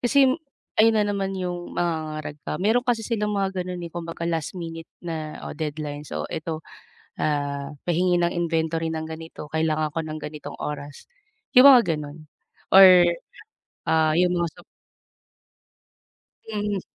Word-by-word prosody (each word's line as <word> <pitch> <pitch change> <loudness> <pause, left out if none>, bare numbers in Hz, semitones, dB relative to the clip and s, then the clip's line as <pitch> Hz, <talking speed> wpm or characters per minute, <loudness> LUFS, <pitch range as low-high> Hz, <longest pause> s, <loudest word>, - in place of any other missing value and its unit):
Kasi 265 +2 +4 0.5
ayun 225 +1 +6
na 210 - +4
naman 195 -1 -2
'yung 175 -1 -4
mangangarag 155 -3 -2
ka. - - -2
Meron 230 +5 +2
kasi 235 -2 +1
silang 210 -3 -1
mga 195 -2 -1
gano'n, 180 -1 -5
eh, 170 - -7
kumbaga 170 -1 -6
last 165 -1 -2
minute 165 -2 -6 0.2
na 160 -2 -4
o - - -5
deadlines, 150 -1 -4
so - - -3
eto, 160 0 -4 0.6
"ah, 145 -2 -1 0.2
pahingi 180 +1 +2
ng 170 0 +2
inventory 165 -1 0
ng 160 0 -3
ganito, 160 -1 -8
kailangan 155 -1 0
ko 165 - -2
ng 155 -1 -6
ganitong 150 -1 -7
oras," 145 -1 -6 0.5
'yung 255 +1 +9
mga 245 -11 +7
gano'n 150 +1 -9 0.5
or, 185 -2 +10 0.8
ah, 160 -1 +3
'yung 180 0 +4
mga 175 -1 +1
sup - - -15 1.9
Mhm. 205 -2 -1
165 Hz, 145 wpm, -24 LUFS, 155-190 Hz, 1.9 s, or